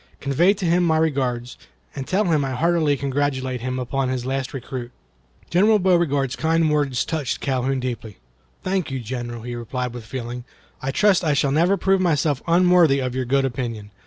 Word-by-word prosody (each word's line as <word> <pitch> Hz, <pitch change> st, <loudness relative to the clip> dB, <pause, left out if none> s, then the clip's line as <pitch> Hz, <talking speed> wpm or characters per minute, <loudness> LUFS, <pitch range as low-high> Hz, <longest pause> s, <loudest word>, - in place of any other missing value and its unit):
Convey 170 Hz, +9 st, +2 dB
to 195 Hz, -2 st, -4 dB
him 175 Hz, +1 st, +3 dB
my 160 Hz, -2 st, +2 dB
regards, 130 Hz, -6 st, -1 dB, 0.4 s
and 135 Hz, -, -5 dB
tell 195 Hz, +3 st, +2 dB
him 155 Hz, -5 st, +2 dB
I 135 Hz, -1 st, -2 dB
heartily 155 Hz, 0 st, +2 dB
congratulate 135 Hz, -2 st, -1 dB
him 130 Hz, +1 st, -3 dB
upon 130 Hz, +1 st, -1 dB
his 130 Hz, -1 st, -2 dB
last 135 Hz, 0 st, -2 dB
recruit." 125 Hz, -2 st, -6 dB, 0.6 s
General 210 Hz, +5 st, +5 dB
Beauregard's 170 Hz, -8 st, +1 dB
kind 160 Hz, 0 st, +1 dB
words 145 Hz, -5 st, +1 dB
touched 150 Hz, -6 st, -2 dB
Calhoun 130 Hz, 0 st, -1 dB
deeply. 120 Hz, -5 st, -5 dB, 0.5 s
"Thank 185 Hz, -3 st, -1 dB
you, 135 Hz, -1 st, -3 dB
General," 120 Hz, -1 st, -5 dB
he 120 Hz, 0 st, -5 dB
replied, 120 Hz, +1 st, -4 dB
with 120 Hz, -2 st, -7 dB
feeling. 120 Hz, +1 st, -6 dB, 0.4 s
"I 135 Hz, -, -3 dB
trust 195 Hz, +6 st, +3 dB
I 150 Hz, -3 st, +2 dB
shall 140 Hz, 0 st, +1 dB
never 170 Hz, +7 st, +3 dB
prove 195 Hz, +1 st, +2 dB
myself 150 Hz, -5 st, +1 dB
unworthy 175 Hz, -4 st, +5 dB
of 130 Hz, -2 st, -2 dB
your 130 Hz, 0 st, -2 dB
good 135 Hz, +2 st, +2 dB
opinion. 115 Hz, -5 st, -4 dB
135 Hz, 180 wpm, -22 LUFS, 125-165 Hz, 0.6 s, General